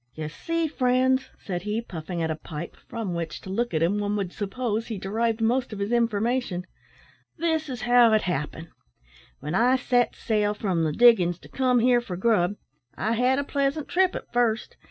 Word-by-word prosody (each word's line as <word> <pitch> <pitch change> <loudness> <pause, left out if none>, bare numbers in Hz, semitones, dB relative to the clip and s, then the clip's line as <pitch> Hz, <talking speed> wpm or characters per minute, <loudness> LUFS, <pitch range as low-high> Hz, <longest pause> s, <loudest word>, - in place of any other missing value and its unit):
"Ye 155 -1 -4
see, 330 - -2
friends," 260 -1 +1
said 180 -3 -4
he, 210 +4 -2
puffing 170 -5 -5
at 160 - 0
a - - -1
pipe, 155 +1 -7
from 225 -6 -4
which, 165 -2 -4
to 190 - -8
look 235 +5 -1
at 160 -1 +1
him, 195 +5 +1
one 205 0 -1
would 195 -4 -3
suppose 225 +1 -2
he 225 - -4
derived 225 +4 -1
most 240 +2 +1
of 210 - -6
his 200 +2 -2
information, 230 -4 0 0.7
"this 320 -2 0
is 250 -2 -5
how 245 -1 +6
it 215 - +3
happened. 160 -1 -3 0.7
When 150 - -4
I 245 +6 +4
set 245 -1 +1
sail 210 -2 0
from 185 -6 0
the 155 - 0
diggin's 180 -4 +5
to - - -14
come 255 -2 +2
here 245 +1 +4
for 185 -7 -6
grub, 200 -2 +2 0.4
I 220 - -1
had 250 +3 +2
a 285 - 0
pleasant 280 +1 -1
trip 370 0 +2
at - - -8
first. 235 -2 0
225 Hz, 195 wpm, -25 LUFS, 185-250 Hz, 0.7 s, how